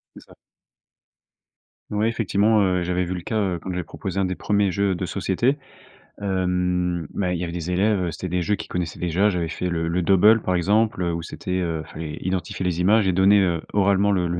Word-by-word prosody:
C'est -, -, -12 dB
ça. -, -, -18 dB, 1.6 s
Ouais, 105 Hz, +1 st, +1 dB
effectivement, 110 Hz, -1 st, +2 dB
heu, 90 Hz, -2 st, +1 dB
j'avais 90 Hz, +1 st, 0 dB
vu 90 Hz, +1 st, -3 dB
le 90 Hz, -, -5 dB
cas, 110 Hz, -, -4 dB
heu, 95 Hz, -4 st, -1 dB
quand 95 Hz, -, -6 dB
j'avais 90 Hz, 0 st, -3 dB
proposé 95 Hz, +3 st, -5 dB
1 95 Hz, -, +2 dB
des 90 Hz, 0 st, -2 dB
1ers 100 Hz, 0 st, +1 dB
jeux 100 Hz, +1 st, +1 dB
de 90 Hz, +1 st, -3 dB
société. 100 Hz, +9 st, 0 dB, 0.6 s
Hem, 90 Hz, -3 st, 0 dB
mais 90 Hz, -2 st, -1 dB
il -, -, -6 dB
y -, -, -3 dB
avait 85 Hz, -, -6 dB
des 90 Hz, 0 st, -4 dB
élèves, 100 Hz, +2 st, +2 dB
heu, 85 Hz, -, -2 dB
c'était 95 Hz, -, -5 dB
des 90 Hz, 0 st, -1 dB
jeux 105 Hz, +4 st, +1 dB
qu'ils 80 Hz, -4 st, -8 dB
connaissaient 85 Hz, -3 st, -4 dB
déjà. 90 Hz, +4 st, +2 dB
J'avais 90 Hz, -4 st, -1 dB
fait 85 Hz, +3 st, -3 dB
le 80 Hz, -1 st, -1 dB
le 85 Hz, +2 st, 0 dB
Dobble 105 Hz, +5 st, +5 dB
par 90 Hz, -, 0 dB
exemple, 105 Hz, +3 st, +1 dB
heu, 85 Hz, -1 st, 0 dB
où 85 Hz, -, -3 dB
c'était 90 Hz, +2 st, -4 dB
heu, 80 Hz, -3 st, -2 dB
il -, -, -17 dB
fallait 75 Hz, -1 st, -6 dB
identifier 95 Hz, 0 st, -3 dB
les 90 Hz, -1 st, 0 dB
images 105 Hz, +2 st, +4 dB
et 95 Hz, -, +2 dB
donner, 95 Hz, +3 st, +5 dB
heu, 85 Hz, -4 st, +1 dB
oralement 100 Hz, 0 st, +3 dB
le 90 Hz, -3 st, +1 dB
le 85 Hz, -, -2 dB
90 Hz, 230 wpm, -23 LUFS, 85-100 Hz, 1.6 s, Dobble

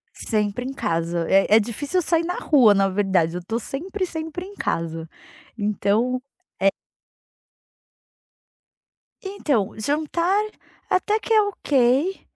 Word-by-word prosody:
Sempre 210 Hz, +1 st, -1 dB
em 260 Hz, -, -4 dB
casa, 170 Hz, -5 st, -1 dB
é, 195 Hz, 0 st, +4 dB
é -, -, +8 dB
difícil 245 Hz, -, -3 dB
eu -, -, +4 dB
sair 330 Hz, +1 st, +2 dB
na 355 Hz, +2 st, -2 dB
rua, 255 Hz, -8 st, +5 dB
na 195 Hz, 0 st, +3 dB
verdade, 190 Hz, -4 st, +1 dB
eu 180 Hz, -, -5 dB
tô 225 Hz, +5 st, -2 dB
sempre, 365 Hz, -, -4 dB
sempre 320 Hz, +1 st, -6 dB
em 400 Hz, -, -11 dB
casa, 165 Hz, -, -3 dB, 0.5 s
então, 210 Hz, +4 st, 0 dB, 0.4 s
eh 195 Hz, -, +5 dB, 2.5 s
Então, 285 Hz, -, -1 dB
jantar 325 Hz, -, 0 dB, 0.5 s
até 415 Hz, +4 st, +1 dB
que 450 Hz, -, -1 dB
é 435 Hz, -, +6 dB
ok. 295 Hz, -4 st, +1 dB
250 Hz, 125 wpm, -23 LUFS, -, 2.5 s, é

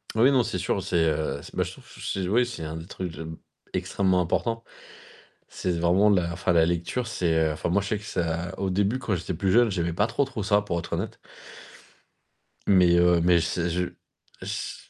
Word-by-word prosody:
Oui, 120 Hz, +5 st, +5 dB
non, 130 Hz, -2 st, +4 dB
c'est 90 Hz, -, -3 dB
sûr, 90 Hz, +2 st, -1 dB
c'est, 90 Hz, -, -3 dB
heu 80 Hz, 0 st, -1 dB
c -, -, -11 dB
bah -, -, +1 dB
je -, -, -6 dB
trouve, -, -, -16 dB
ch -, -, -7 dB
c'est 95 Hz, -2 st, -2 dB
oui, 115 Hz, +6 st, +3 dB
c'est 120 Hz, -8 st, -6 dB
un 80 Hz, +1 st, -5 dB
des 80 Hz, +1 st, -9 dB
trucs 90 Hz, -4 st, -6 dB, 0.6 s
extrêmement 95 Hz, -2 st, +1 dB
importants. 115 Hz, +6 st, -1 dB, 0.8 s
C'est 90 Hz, -, -3 dB
vraiment 90 Hz, +5 st, +4 dB
la 90 Hz, -4 st, +2 dB
enfin, 85 Hz, +1 st, -1 dB
la 85 Hz, -1 st, +5 dB
lecture, 85 Hz, +9 st, -1 dB
c'est, 90 Hz, -7 st, 0 dB
heu, 80 Hz, -1 st, +2 dB
enfin, 75 Hz, -, -3 dB
moi, 100 Hz, +4 st, +2 dB
je 100 Hz, -, -5 dB
sais 105 Hz, -, 0 dB
que 105 Hz, -, -11 dB
ça 85 Hz, -1 st, -2 dB
au 95 Hz, -, 0 dB
début, 100 Hz, +6 st, +1 dB
quand 105 Hz, -6 st, -1 dB
j'étais 90 Hz, +1 st, -4 dB
plus 95 Hz, +3 st, 0 dB
jeune, 120 Hz, +1 st, +5 dB
j'aimais 85 Hz, -3 st, -1 dB
pas 105 Hz, +5 st, +2 dB
trop, 120 Hz, +5 st, 0 dB
trop 130 Hz, -6 st, -5 dB
ça, 105 Hz, 0 st, +3 dB
pour 95 Hz, -4 st, -3 dB
être 85 Hz, -, -5 dB
honnête. -, -, -3 dB, 1.5 s
Mais, 90 Hz, -3 st, +5 dB
heu, 85 Hz, -1 st, +4 dB
mais 85 Hz, 0 st, +4 dB
c'est 85 Hz, +1 st, -1 dB
je 90 Hz, +1 st, 0 dB, 0.6 s
c -, -, -5 dB
90 Hz, 215 wpm, -26 LUFS, 85-105 Hz, 1.5 s, Oui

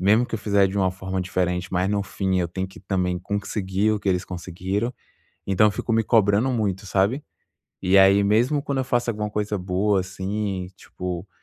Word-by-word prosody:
mesmo 105 Hz, +6 st, +4 dB
que 115 Hz, -, -5 dB
eu -, -, -1 dB
fizer 100 Hz, -1 st, +3 dB
de 95 Hz, +1 st, -4 dB
uma 95 Hz, -1 st, +2 dB
forma 95 Hz, 0 st, -4 dB
diferente, 90 Hz, 0 st, -1 dB
mas 90 Hz, +1 st, +1 dB
no 100 Hz, -1 st, +1 dB
fim 95 Hz, -1 st, -1 dB
eu 85 Hz, -, -1 dB
tenho 95 Hz, +3 st, -3 dB
que 95 Hz, -, -14 dB
também 90 Hz, -2 st, -1 dB
conseguir 100 Hz, +1 st, -1 dB
o 105 Hz, -, -1 dB
que 100 Hz, -, -2 dB
eles 90 Hz, -1 st, +1 dB
conseguiram. 95 Hz, +5 st, -3 dB, 0.5 s
Então 100 Hz, +2 st, +4 dB
eu -, -, 0 dB
fico 105 Hz, +3 st, -3 dB
me 115 Hz, -, +3 dB
cobrando 110 Hz, +2 st, +3 dB
muito, 105 Hz, -5 st, -1 dB
sabe. 100 Hz, +9 st, +1 dB, 0.6 s
E 95 Hz, +2 st, +5 dB
aí, 95 Hz, +1 st, +6 dB
mesmo 120 Hz, +8 st, +2 dB
quando 140 Hz, -2 st, -2 dB
eu 130 Hz, -, 0 dB
faço 120 Hz, -1 st, 0 dB
alguma 105 Hz, -1 st, -3 dB
coisa 105 Hz, 0 st, -2 dB
boa, 95 Hz, +2 st, +1 dB
assim, 95 Hz, 0 st, -3 dB
tipo, 90 Hz, +1 st, -6 dB
100 Hz, 200 wpm, -24 LUFS, 95-105 Hz, 0.6 s, aí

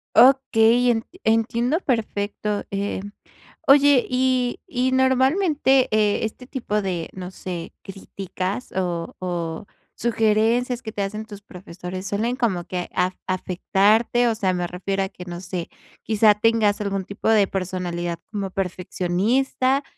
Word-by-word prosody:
Okey, 245 Hz, -1 st, +5 dB
en 225 Hz, -1 st, -1 dB, 0.2 s
entiendo 235 Hz, +6 st, +1 dB
perfecto, 210 Hz, -, -2 dB
eh. 200 Hz, 0 st, -2 dB, 0.7 s
Oye, 280 Hz, -2 st, +6 dB
y 255 Hz, -1 st, +1 dB
y 260 Hz, -7 st, 0 dB
normalmente, 265 Hz, +1 st, +3 dB
eh, 215 Hz, 0 st, +2 dB
este 245 Hz, +3 st, -7 dB
tipo 220 Hz, -6 st, -2 dB
de, 180 Hz, -4 st, -3 dB
no 180 Hz, -1 st, -7 dB
sé, 180 Hz, -2 st, -7 dB
críticas, 195 Hz, +2 st, -5 dB
o 175 Hz, -3 st, -2 dB
o 175 Hz, -1 st, -4 dB, 0.3 s
sugerencias 230 Hz, +2 st, +1 dB
que 220 Hz, -3 st, -6 dB
te 205 Hz, -, -2 dB
hacen 210 Hz, +2 st, -4 dB
tus 205 Hz, -2 st, -11 dB
profesores, 180 Hz, 0 st, -8 dB
¿suelen 230 Hz, +5 st, -1 dB
como 195 Hz, -9 st, 0 dB
que 180 Hz, -1 st, -4 dB
af 185 Hz, +1 st, +1 dB
afectarte? 200 Hz, +6 st, +2 dB
O 230 Hz, -, +2 dB
sea, 200 Hz, -4 st, 0 dB
me 180 Hz, -1 st, -1 dB
refiero 195 Hz, +2 st, -2 dB
a 190 Hz, -, -3 dB
que 180 Hz, -, -11 dB
no 175 Hz, 0 st, -7 dB
sé, 180 Hz, -2 st, -5 dB, 0.3 s
quizá, 215 Hz, -1 st, +4 dB
tengas 210 Hz, -1 st, +2 dB
algún 195 Hz, -2 st, -2 dB
tipo 200 Hz, +2 st, -3 dB
de 215 Hz, -2 st, +5 dB
personalidad 175 Hz, -3 st, -3 dB
como 200 Hz, -3 st, -3 dB
perfeccionista, 195 Hz, +9 st, 0 dB
210 Hz, 135 wpm, -23 LUFS, 185-245 Hz, 0.7 s, Oye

